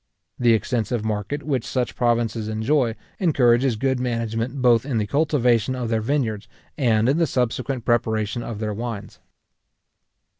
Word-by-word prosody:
The 120 -2 +4
extensive 115 +1 -1
market 110 +7 -3
which 135 -6 -1
such 125 -2 -2
provinces 115 -2 0
enjoy, 115 +2 +1 0.2
encourages 130 - +3
good 130 +3 0
management 115 +1 -2
both 120 -3 +4
in 130 -4 -2
the 105 - 0
cultivation 130 -3 +2
of 125 -3 -3
their 110 -1 +1
vineyards, 110 -4 -1 0.3
and 115 -5 +2
in 140 +5 +2
the 165 - +3
subsequent 125 0 -1
preparation 110 -1 0
of 115 -2 -5
their 105 0 -3
wines. 115 -1 -6
120 Hz, 145 wpm, -23 LUFS, 110-130 Hz, 0.3 s, The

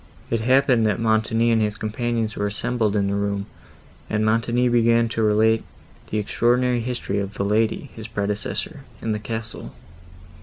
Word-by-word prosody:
It 115 -1 +1
happened 130 -1 +3
that 105 -1 0
Montoni 115 +1 +2
and 115 -1 +3
his 105 -1 -1
companions 115 0 -2
were 105 - -1
assembled 110 0 -1
in 100 -1 +2
the 100 - -1
room, 100 0 -1 0.6
and 110 0 0
Montoni 115 +3 +2
began 115 -1 +3
to 115 - -2
relate 110 +1 +3 0.5
the 110 - -2
extraordinary 120 +4 +1
history 120 -4 -2
of 100 +1 -4
the 100 - -1
lady, 110 +5 0
his 110 -1 -7
predecessor, 105 +8 -2 0.2
in 115 - -2
the 105 - -1
castle. 110 +1 -6
110 Hz, 160 wpm, -23 LUFS, 105-115 Hz, 0.6 s, happened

